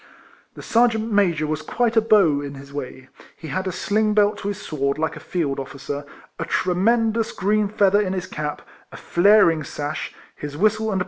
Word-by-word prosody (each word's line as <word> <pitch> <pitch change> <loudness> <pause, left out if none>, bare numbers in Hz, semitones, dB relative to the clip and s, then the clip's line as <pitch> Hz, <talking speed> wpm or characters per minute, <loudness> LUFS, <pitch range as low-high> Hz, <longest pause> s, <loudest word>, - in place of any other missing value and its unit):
The - - -10
Sergeant 230 -1 +2
Major 175 -7 +2
was 155 0 -2
quite 235 +6 -1
a 225 - +5
beau, 195 -10 +4
in 140 -1 -7
his 140 +1 -12
way; 130 -2 -7 0.3
he 160 - -9
had 185 +5 -2
a - - -1
sling 210 +4 0
belt 205 0 +3
to 200 - -5
his 205 -1 -3
sword 140 -2 -2
like 160 +1 -2
a - - -8
field 145 -6 -2
officer, 140 +1 -6 0.3
a - - -2
tremendous 225 +5 +1
green 210 +2 +1
feather 205 -1 +3
in 190 -2 -2
his 185 -1 -3
cap, 150 -1 -5 0.3
a - - -10
flaring 175 -4 +4
sash, 145 +1 -5 0.2
his 145 0 -7
whistle 215 +4 +2
and - - -1
RIFLEMAN 195 - 0
HAURIS. - - 0
185 Hz, 200 wpm, -22 LUFS, 150-215 Hz, 0.3 s, a